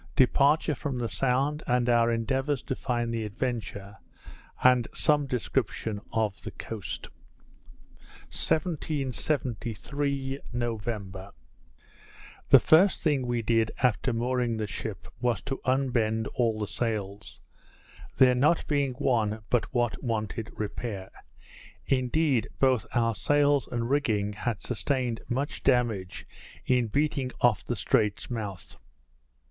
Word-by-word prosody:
Departure 145 +4 +4
from 135 0 -3
the 120 -1 -1
Sound, 135 +5 0
and 125 0 +2
our 120 -1 +4
Endeavours 130 +4 0
to 130 - -3
find 120 -3 -2
the 115 -1 -1
Adventure; 105 -2 -4 0.7
with 125 -2 +5
some 145 -2 +2
Description 115 -4 -2
of 110 -3 -1
the 105 - -6
Coast._ 105 -1 -6 1.2
1773 140 - -1
November 105 -5 -4 1.2
The - - +10
first 180 +5 +4
thing 140 -5 +1
we 120 -1 -1
did 115 0 +2
after 125 +1 +2
mooring 120 0 0
the 110 - -1
ship, 95 - -6
was 120 -1 +1
to 135 -1 -4
unbend 120 -4 +1
all 115 -3 +1
the 105 - -2
sails; 105 -1 -4 0.8
there 130 -1 +6
not 145 +7 +3
being 140 -3 0
one 110 -4 0
but 120 - +1
what 120 -2 0
wanted 110 -2 -2
repair. 105 -2 -5 0.7
Indeed, 130 -1 +1
both 130 -6 +2
our 115 -1 +2
sails 145 +4 +2
and 120 -1 -1
rigging 110 -7 +1
had 105 0 -3
sustained 125 -1 -1
much 135 +4 -2
damage 115 -8 0 0.4
in 125 -2 +2
beating 140 +2 0
off 120 -8 +3
the - - -2
Strait's 105 +2 0
mouth. 105 -7 -5
120 Hz, 120 wpm, -28 LUFS, 110-135 Hz, 1.2 s, The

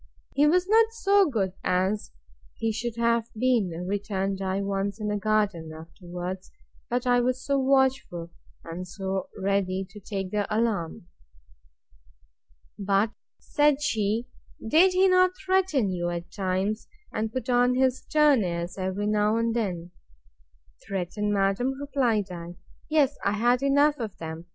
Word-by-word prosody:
He 290 +2 +4
was 360 +4 +3
not 445 +2 +4
so 400 -5 +3
good 195 -8 -1
as 185 +3 0 0.5
he 225 - 0
should 230 +1 -4
have 235 0 +1
been, 240 -5 +2 0.2
returned 195 -1 -2
I, 190 +1 -1
once 200 +1 -2
in 210 -1 -2
the 210 - 0
garden, 205 -6 0
afterwards; 175 +3 -7 0.4
but 245 +1 -1
I 245 0 +4
was 255 +1 -1
so 280 -1 +1
watchful, 265 -11 +1 0.3
and 170 +2 -7
so 190 +1 -4
ready 195 -1 0
to 205 +2 -12
take 195 -2 -5
the 205 -1 -1
alarm! 215 -7 -1 1.7
But, 200 +2 +1 0.3
said 295 -1 +2
she, 220 -2 0 0.4
did 350 +9 +5
he 375 +1 +4
not 365 0 +4
threaten 370 - +1
you, 175 -1 -2
at 175 0 -5
times, 195 +3 -2 0.3
and 220 0 -2
put 255 +2 -4
on 245 0 +3
his 260 0 +2
stern 300 -6 +3
airs, 175 +1 -4
every 190 +2 -2
now 210 +1 +2
and 230 0 0
then?—Threaten, 170 - -6
madam, 205 +7 0
replied 245 -9 0
I; 175 0 -7 0.3
yes, 295 -3 +2
I 200 - +1
had 240 +4 +2
enough 285 +1 +3
of 215 -4 -5
that! 160 -1 -7
210 Hz, 140 wpm, -26 LUFS, 185-255 Hz, 1.7 s, did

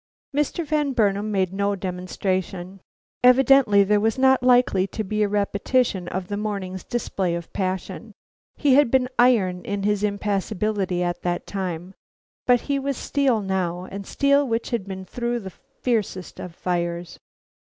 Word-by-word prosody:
Mr. 295 +3 0
Van 295 -2 0
Burnam 205 -2 +1
made 190 -2 0
no 200 +1 0
demonstration. 185 0 -3 0.4
Evidently 250 -4 +6
there 210 +1 +2
was 220 +4 +1
not 265 0 +4
likely 245 -7 +4
to 215 - -4
be 215 +2 -2
a 210 - +3
repetition 200 0 0
of 180 +1 -4
the 205 - -3
morning's 195 -3 -4
display 190 -7 -2
of 170 -1 -7
passion. 190 +3 -3 0.4
He 285 -3 +3
had 285 -2 +5
been 255 0 +3
iron 200 -8 +3
in 200 -1 -3
his 205 0 +1
impassibility 200 -2 -1
at 175 0 -2
that 175 0 -2
time, 185 -2 -4 0.5
but 245 -2 +5
he 280 -1 -1
was 275 -1 -2
steel 270 -6 +1
now, 180 -2 -2
and 200 0 -7
steel 280 0 +2
which 230 +1 -2
had 225 -5 -2
been 190 -1 -6
through 240 +4 -2
the 190 -2 -8
fiercest 230 -8 -3
of 175 -2 -8
fires. 175 -1 -3
200 Hz, 155 wpm, -23 LUFS, 185-245 Hz, 0.5 s, Evidently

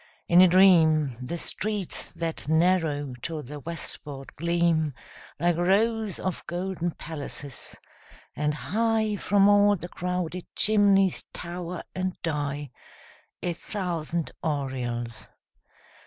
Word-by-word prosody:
In 175 +1 +7
a 185 - +9
dream 160 -7 +5
The 150 +7 -3
streets 205 +2 -3
that 165 -2 -4
narrow 160 -4 +2
to 160 0 -4
the 145 +4 -8
westward 145 -3 -4
gleam 170 -3 +1 0.4
Like 175 +1 +2
rows 210 +3 +2
of 185 -1 -3
golden 175 0 -2
palaces; 145 -5 -6 0.6
and 150 0 0
high 220 +4 0
From 200 0 +4
all 205 0 +6
the 175 -1 -7
crowded 180 0 -3
chimneys 200 -3 +4
tower 175 0 -5
and 185 0 -3
die 145 -3 -2 0.7
A 175 - 0
thousand 170 -4 -3
aureoles. 125 -6 -3
170 Hz, 110 wpm, -27 LUFS, 150-185 Hz, 0.7 s, a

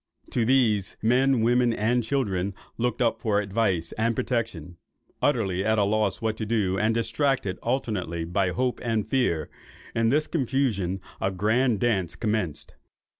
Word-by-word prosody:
To 120 - +1
these, 110 -6 +2
men, 125 +2 +3
women, 120 +1 +3
and 120 +3 +1
children, 100 -7 -1 0.2
looked 125 +1 0
up 115 - 0
for 105 -2 +2
advice 100 -5 0
and 115 +1 +1
protection. 100 - -3 0.4
Utterly 100 -9 +1
at 110 +1 +2
a 105 - +4
loss 105 +1 0
what 110 -1 0
to 110 - -3
do, 105 -4 +1
and 110 +1 +2
distracted 115 -4 0
alternately 105 -10 -2
by 90 +2 0
hope 125 +8 -1
and 115 -3 -1
fear, 110 - +1 0.5
in 115 0 +2
this 150 +4 +2
confusion 120 - -1 0.2
a 95 - +1
grand 110 +4 +1
dance 95 -8 0
commenced. 95 -9 -2
110 Hz, 150 wpm, -26 LUFS, 95-120 Hz, 0.5 s, a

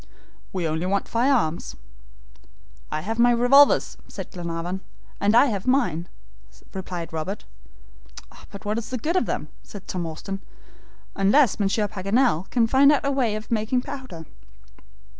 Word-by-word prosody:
"We 180 -3 -2
only 160 +3 -2
want 200 +1 0
fire 245 +4 +2
arms." 170 - 0 1.2
"I 155 - -2
have 225 +6 -4
my 240 +1 +6
revolvers," 245 +4 +5
said - - -8
Glenarvan. 175 +1 -4 0.4
"And 205 +2 +3
I 245 - +7
have 205 -6 -3
mine," 185 - +1 0.6
replied 180 -3 -6
Robert. 175 +6 -4 1.0
"But 200 -1 -11
what's 215 +2 -2
the 255 - -2
good 315 +9 -2
of 370 - +2
them?" - - -3
said 200 -2 -12
Tom 175 -2 -3
Austin, 195 +5 -6 0.7
"unless 210 +6 +3
Monsieur 205 +1 +1
Paganel 200 -1 +1
can 235 -2 +2
find 270 +5 +5
out 290 - +2
some 280 0 0
way 235 -6 +1
of 215 +2 -7
making 230 +3 +1
powder." 255 -13 -8
210 Hz, 145 wpm, -24 LUFS, 180-245 Hz, 1.2 s, I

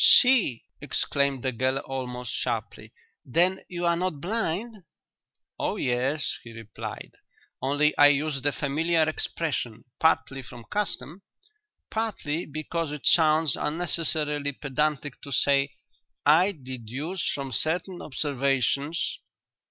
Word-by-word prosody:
"See!" 245 - +6 0.2
exclaimed 140 -2 0
the 130 - +1
girl 130 +2 +1
almost 125 -3 -4
sharply. - - -3 0.3
"Then 180 +8 +2
you 175 -1 -3
are 170 0 +4
not 175 -4 -2
blind?" 215 +4 -2 0.8
"Oh - - 0
yes," 130 +4 0
he 115 - -10
replied; 115 -2 -7 0.5
"only 145 +3 +2
I 145 - +10
use 145 -1 +1
the 145 +2 +2
familiar 160 +4 +1
expression, 155 -6 -2 0.2
partly 160 -4 +2
from 120 -1 -11
custom, 175 - -3 0.7
partly 195 -8 -2
because 155 +1 -3
it 150 -1 -6
sounds 155 -3 +5
unnecessarily 150 -3 -1
pedantic 145 0 -2
to 140 - -9
say, 140 +2 +3 0.6
'I 170 +7 +5
deduce 130 - -4
from 135 -2 -4
certain 165 - -1
observations.'" 140 +2 0
145 Hz, 115 wpm, -27 LUFS, 135-165 Hz, 0.8 s, I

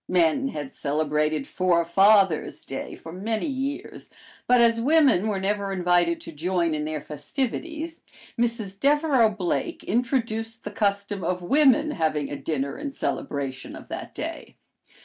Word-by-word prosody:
Men 180 - +3
had 145 - -5
celebrated 150 0 0
"Forefathers' 185 +1 +3
Day" 135 - -6
for 160 - -10
many 215 - -2
years, 275 0 -4 0.4
but 250 0 +5
as 230 -1 +4
women 270 - +4
were 205 -3 -1
never 200 0 -1
invited 175 -2 +2
to - - -8
join 170 +1 0
in 150 0 -2
their 155 0 -3
festivities, 275 - -4 0.3
Mrs. 230 -5 -2
Devereux 285 -4 +4
Blake 180 -9 -2
introduced 225 -2 -1
the 210 - -5
custom 200 -2 -1
of 180 +1 -1
women 290 - +4
having 155 - -1
a - - -2
dinner 140 -1 -3
in 290 -1 -3
celebration 135 - -4
of - - -11
that - - -6
day. - - -6
195 Hz, 140 wpm, -25 LUFS, 160-235 Hz, 0.4 s, but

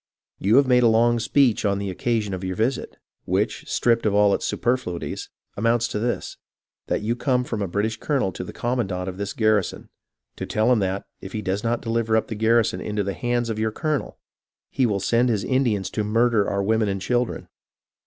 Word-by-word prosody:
You 105 +4 +3
have 140 +1 +6
made 125 -1 +4
a 120 - +5
long 115 +1 +3
speech 125 0 +2
on 100 -2 +1
the 100 -1 -3
occasion 110 +1 -1
of 95 0 -5
your 95 0 -3
visit, 120 +5 -1 0.3
which, 100 +5 -1
stripped 115 -2 +2
of 100 - +1
all 105 -1 +5
its - - -1
superflui 120 -9 -1
ties, - - -6 0.3
amounts 115 +2 +1
to - - -2
this 120 +2 -2 0.3
— - - -70
that - - -1
you 115 +2 0
come 125 0 +1
from 115 -4 -4
a 100 - -1
British 105 +5 -1
colo 145 - 0
nel 95 - 0
to 90 - -6
the - - -8
commandant 100 -7 -2
of 95 -1 -5
this 100 0 -3
garrison, 110 -4 0 0.5
to - - -5
tell 110 +3 +2
him 120 - +4
that, 95 0 -2 0.2
if 95 - -9
he 105 - -3
does 95 +2 -2
not 115 +1 -1
deliver 115 -1 +1
up 110 - -1
the - - -3
garrison 110 -3 +2
into 105 -1 -2
the 100 0 -2
hands 120 0 -1
of 110 - -4
your 110 0 0
colonel, 155 +3 -2 0.5
he 130 -2 +2
will 100 -3 0
send 120 +5 +2
his 105 -4 0
Indians 120 -8 0
to 105 - -1
murder 115 0 +2
our 100 0 -1
women 110 0 +1
and 95 0 -2
children. 120 +4 -1
110 Hz, 220 wpm, -23 LUFS, 100-120 Hz, 0.5 s, have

